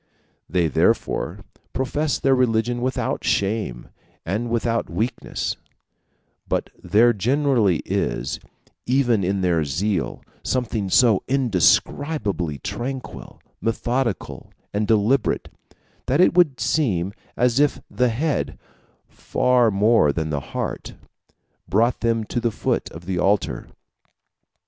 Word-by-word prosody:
They 85 -2 +2
therefore 75 - 0 0.3
profess 140 +4 0
their 135 - +2
religion 120 -1 +1
without 130 +1 -1
shame 100 - -1 0.4
and 110 +7 -2
without 115 0 0
weakness; 120 +4 -3 0.9
but - - -1
there 120 +3 +4
generally 120 - +2
is, - - -2 0.5
even 120 -5 +2
in 95 +2 0
their 85 -3 +2
zeal, 90 +6 -2 0.2
something 115 -6 -1
so 110 0 +4
indescribably 115 - +1
tranquil, 130 - -6 0.2
methodical, 120 0 -2 0.2
and 105 +1 0
deliberate, 110 +3 +2 0.6
that 135 +4 +2
it 180 - +5
would 170 -7 +3
seem 100 - 0 0.2
as 125 +1 +2
if 145 0 +2
the 125 -1 +1
head, 140 +6 -1 0.5
far 125 -2 +2
more 105 -6 +4
than 80 0 -3
the 75 - 0 0.2
heart, - - -4 0.7
brought 115 +6 +2
them 115 -1 +1
to 120 - -3
the 120 - +1
foot 105 - -1
of 85 +2 -11
the 90 -1 -2
altar. 100 +2 0
115 Hz, 110 wpm, -22 LUFS, 95-125 Hz, 0.9 s, it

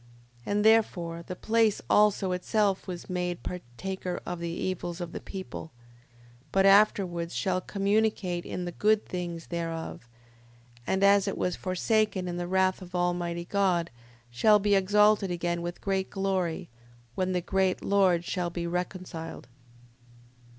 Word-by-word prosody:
5:20. - - -2
And, 205 +1 +1
therefore, 175 -7 +2
the 185 - -5
place 220 +1 +2
also 210 -2 +3
itself 195 +2 0
was 180 -2 -6
made 180 -1 -3
partaker 180 +4 -5
of 175 -1 -4
the 170 0 -3
evils 175 0 -3
of 175 -2 -5
the - - -5
people: 190 -4 -7 0.8
but 195 0 +3
afterwards 195 -4 +3
shall 185 -1 0
communicate 200 -3 0
in 180 - -4
the 175 - -4
good 215 +4 +2
things 175 -2 -5
thereof, 165 -7 -5 0.8
and 190 +1 +1
as 200 0 +5
it 195 - -2
was 180 - 0
forsaken 190 0 0
in 175 0 -3
the 175 0 -3
wrath 190 +1 +2
of 180 0 -9
Almighty 175 -1 -1
God, 180 -4 +1 0.4
shall 210 - +5
be 205 0 +1
exalted 205 +1 +4
again 175 -1 -2
with 175 0 -5
great 190 -1 -1
glory, 190 -4 -1 0.5
when 185 +4 -1
the 180 - +1
great 190 +1 0
Lord 185 -4 +3
shall 180 -2 -2
be 170 0 -4
reconciled. 180 -2 -5
185 Hz, 145 wpm, -28 LUFS, 175-200 Hz, 0.8 s, as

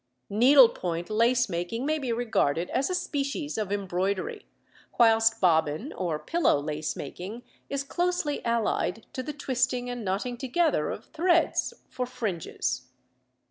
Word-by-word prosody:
Needlepoint 215 -7 +4
lace 240 +3 +3
making 185 +7 -3
may 310 +1 +1
be 260 -4 -2
regarded 200 -9 0
as 270 - 0
a 365 - 0
species 290 -2 -2
of 210 -3 -2
embroidery, 190 -1 -2 0.5
whilst 225 -1 +5
bobbin 160 - +2
or 170 -4 -2
pillow 235 - +2
lace 150 +1 -3
making 190 - -7 0.3
is 280 0 -2
closely 350 -1 -1
allied 225 -2 0
to 255 - -3
the 300 - -5
twisting 255 -3 -1
and 245 -2 -5
knotting 205 +6 -2
together 270 - +1
of - - -6
threads 340 +1 +1
for 250 -1 -4
fringes. 170 - -3
230 Hz, 135 wpm, -27 LUFS, 180-270 Hz, 0.5 s, whilst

